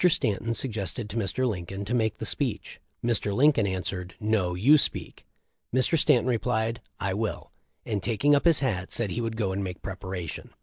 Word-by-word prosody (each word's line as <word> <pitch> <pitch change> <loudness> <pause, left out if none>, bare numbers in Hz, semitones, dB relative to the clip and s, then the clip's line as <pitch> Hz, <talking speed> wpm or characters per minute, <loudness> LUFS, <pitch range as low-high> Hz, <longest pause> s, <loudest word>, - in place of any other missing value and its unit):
Stanton 115 - 0
suggested 105 -2 -3
to - - -7
Mr. 115 +4 0
Lincoln 100 -1 -4
to 115 - -3
make 110 -3 +1
the - - -5
speech. - - -2 0.2
Mr. 105 -4 +1
Lincoln 135 -5 +4
answered. 90 -1 -4
'No, 105 -5 +1
you 140 +12 +6
speak.' - - -2 0.4
Mr. 130 +6 +3
Stanton 150 -7 +4
replied, 115 -1 0 0.2
T 95 - -1
will/ 110 +1 -3 0.3
and 105 -3 -2
taking 120 +8 +2
up 145 - +3
his 165 -4 +5
hat, 95 -9 -1
said 110 -5 +1
he 120 - -2
would 115 -1 -3
go 100 -4 0
and 100 +1 -2
make 90 -1 -6
preparation. 95 -3 -5
Mr. - - -25
110 Hz, 185 wpm, -27 LUFS, 95-120 Hz, 0.4 s, you